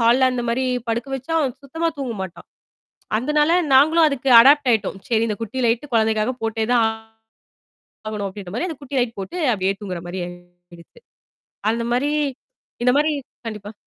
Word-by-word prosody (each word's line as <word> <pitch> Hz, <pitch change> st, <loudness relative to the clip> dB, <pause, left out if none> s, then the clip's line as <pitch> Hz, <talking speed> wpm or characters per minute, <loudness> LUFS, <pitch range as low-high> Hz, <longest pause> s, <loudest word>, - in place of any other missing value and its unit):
ஹால்ல 250 Hz, +3 st, +4 dB
அந்த 245 Hz, -1 st, -2 dB
மாரி 260 Hz, +3 st, 0 dB, 0.3 s
படுக்க 235 Hz, +4 st, -2 dB
வச்சா, 270 Hz, +5 st, -7 dB
அவன் 265 Hz, -4 st, -1 dB
சுத்தமா 325 Hz, +4 st, -2 dB
தூங்க 250 Hz, -4 st, -3 dB
மாட்டான். 190 Hz, -2 st, -9 dB, 0.7 s
அந்தனால 300 Hz, +5 st, +2 dB, 0.2 s
நாங்களும் 315 Hz, +5 st, +6 dB
அதுக்கு 275 Hz, -2 st, -3 dB
அடாப்ட் 280 Hz, +2 st, +5 dB
ஆயிட்டோம். 210 Hz, -3 st, -1 dB
சரி 225 Hz, -1 st, +2 dB
இந்தக் 210 Hz, 0 st, -4 dB
குட்டிலைட்டு 245 Hz, +3 st, -1 dB
குழந்தைக்காகப் 220 Hz, +2 st, +1 dB
போட்டேதான் 225 Hz, +1 st, +1 dB, 1.2 s
ஆகணும் 210 Hz, -2 st, -3 dB
அப்படின்ற 190 Hz, -2 st, -9 dB
மாரி 340 Hz, -, -1 dB
அந்தத் 305 Hz, -4 st, -7 dB
குட்டி 280 Hz, 0 st, -4 dB
லைட் 235 Hz, -3 st, -1 dB
போட்டு 265 Hz, -, -6 dB, 0.2 s
அப்டியே 195 Hz, -1 st, 0 dB
தூங்கற 185 Hz, -4 st, -5 dB
மாரி 180 Hz, +2 st, -5 dB
ஆயிடுத்து. 175 Hz, -, -16 dB, 0.7 s
அந்த 235 Hz, +1 st, -2 dB
மாரி 275 Hz, +4 st, +1 dB, 0.7 s
இந்த 250 Hz, -, +5 dB
மாரி 305 Hz, +1 st, +2 dB, 0.4 s
கண்டிப்பா. 210 Hz, -1 st, -7 dB
235 Hz, 150 wpm, -21 LUFS, 210-270 Hz, 1.2 s, நாங்களும்